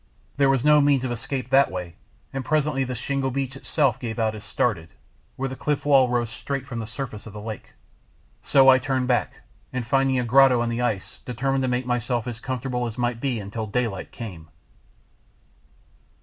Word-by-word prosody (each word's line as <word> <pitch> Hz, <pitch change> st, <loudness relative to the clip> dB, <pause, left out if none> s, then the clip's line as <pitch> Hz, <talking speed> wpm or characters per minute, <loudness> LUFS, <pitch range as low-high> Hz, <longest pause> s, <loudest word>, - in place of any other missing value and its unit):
There 140 Hz, -1 st, +4 dB
was 135 Hz, 0 st, +2 dB
no 150 Hz, 0 st, +6 dB
means 140 Hz, -2 st, +3 dB
of 130 Hz, -, -2 dB
escape 125 Hz, +2 st, -4 dB
that 135 Hz, +1 st, +5 dB
way, 90 Hz, -2 st, -5 dB, 0.4 s
and 135 Hz, -1 st, -3 dB
presently 150 Hz, -1 st, +1 dB
the 125 Hz, -1 st, -4 dB
shingle 135 Hz, +2 st, -1 dB
beach 135 Hz, 0 st, -3 dB
itself 135 Hz, -2 st, 0 dB
gave 115 Hz, -2 st, -5 dB
out 110 Hz, -2 st, +1 dB
as 105 Hz, -1 st, -9 dB
stated, 100 Hz, -8 st, -1 dB, 0.5 s
where 135 Hz, -, -2 dB
the 130 Hz, -, -6 dB
cliff 150 Hz, +1 st, -2 dB
wall 135 Hz, -3 st, +5 dB
rose 120 Hz, -2 st, 0 dB
straight 135 Hz, +3 st, -4 dB
from 125 Hz, -2 st, -5 dB
the 110 Hz, -, -5 dB
surface 110 Hz, -3 st, -6 dB
of 105 Hz, -, -10 dB
the 105 Hz, -, -7 dB
lake, 110 Hz, 0 st, -7 dB, 0.7 s
so 135 Hz, -1 st, +5 dB
I 130 Hz, -1 st, +8 dB
turned 130 Hz, -1 st, -1 dB
back, 125 Hz, -1 st, 0 dB, 0.3 s
and 125 Hz, -2 st, -3 dB
finding 135 Hz, +1 st, +2 dB
a 125 Hz, -, +1 dB
grotto 125 Hz, 0 st, +5 dB
in 120 Hz, -, -1 dB
the 115 Hz, +1 st, -2 dB
ice 105 Hz, -6 st, -2 dB
determined 135 Hz, +3 st, -1 dB
to 130 Hz, -, 0 dB
make 125 Hz, 0 st, 0 dB
myself 120 Hz, -1 st, -1 dB
as 120 Hz, -2 st, -5 dB
comfortable 125 Hz, -1 st, -2 dB
as 115 Hz, -, -7 dB
might 120 Hz, -1 st, -1 dB
be 130 Hz, -5 st, -1 dB
until 105 Hz, +2 st, -5 dB
daylight 105 Hz, -3 st, -2 dB
came. 90 Hz, -9 st, -8 dB
125 Hz, 195 wpm, -24 LUFS, 115-135 Hz, 0.7 s, I